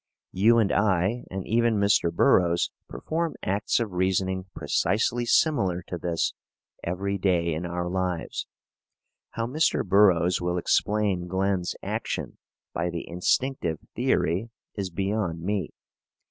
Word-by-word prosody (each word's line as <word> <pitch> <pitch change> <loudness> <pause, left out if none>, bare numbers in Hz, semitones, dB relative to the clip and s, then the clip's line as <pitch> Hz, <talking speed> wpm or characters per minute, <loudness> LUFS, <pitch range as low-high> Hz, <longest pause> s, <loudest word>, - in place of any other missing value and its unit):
You 110 +5 +4
and 110 -4 +3
I, 100 +3 +1
and 95 0 -5
even 115 0 +2
Mr. 100 -4 +3
Burroughs, 85 0 +3 0.2
perform 160 - -3
acts 100 +6 0
of 115 -4 -2
reasoning 95 +1 0
precisely 120 +3 0
similar 100 - +2
to 90 - -5
this 85 0 -1 0.5
every 100 +3 -2
day 85 -3 +1
in 85 +3 -3
our 90 0 -3
lives. 90 -2 -2 0.9
How 115 - -2
Mr. 150 +7 +1
Burroughs 90 -3 +4
will 90 0 -1
explain 100 0 +1
Glen's 95 0 -1
action - - -4 0.3
by 85 +1 -1
the 85 -1 -5
instinctive 90 +1 0 0.2
theory 95 +8 +1 0.2
is 100 -3 -3
beyond 95 -2 -2
me. 95 -3 -1
95 Hz, 125 wpm, -26 LUFS, 90-105 Hz, 0.9 s, You